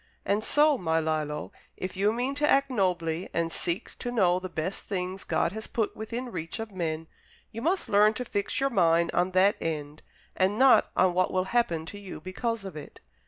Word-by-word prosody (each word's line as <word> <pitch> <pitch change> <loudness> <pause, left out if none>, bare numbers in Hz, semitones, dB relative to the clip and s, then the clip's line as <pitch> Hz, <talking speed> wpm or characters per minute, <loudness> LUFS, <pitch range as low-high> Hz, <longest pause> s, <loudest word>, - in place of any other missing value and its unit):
And 205 +2 +1
so, 295 +2 +4
my 160 -2 +1
Lillo, 155 -2 -2 0.3
if 185 +1 -5
you 200 +3 +2
mean 245 +4 -1
to 295 +1 +1
act 275 0 +3
nobly 180 -5 0
and 165 0 0
seek 170 +2 -2
to 245 - -3
know 185 -6 +3
the 185 0 -6
best 175 +3 -4
things 185 -1 -3
God - - 0
has 220 +2 -6
put 220 -3 -2
within 235 +3 -5
reach 165 -4 -5
of 225 -1 -6
men, 165 -4 -3 0.5
you 230 +1 -6
must 350 +8 0
learn 210 +2 +4
to 250 - -4
fix 205 -3 -2
your 275 0 +1
mind 170 -5 +3
on 180 +1 +2
that 190 +2 +4
end, 150 -2 -4 0.3
and 190 +3 +1
not 265 +1 +6
on 185 -1 +4
what 185 +1 +1
will 185 0 +1
happen 175 -10 +1
to 205 +5 -8
you 195 -2 -8
because 225 +3 -3
of 190 -5 -7
it. 150 - -10
190 Hz, 205 wpm, -28 LUFS, 170-225 Hz, 0.5 s, not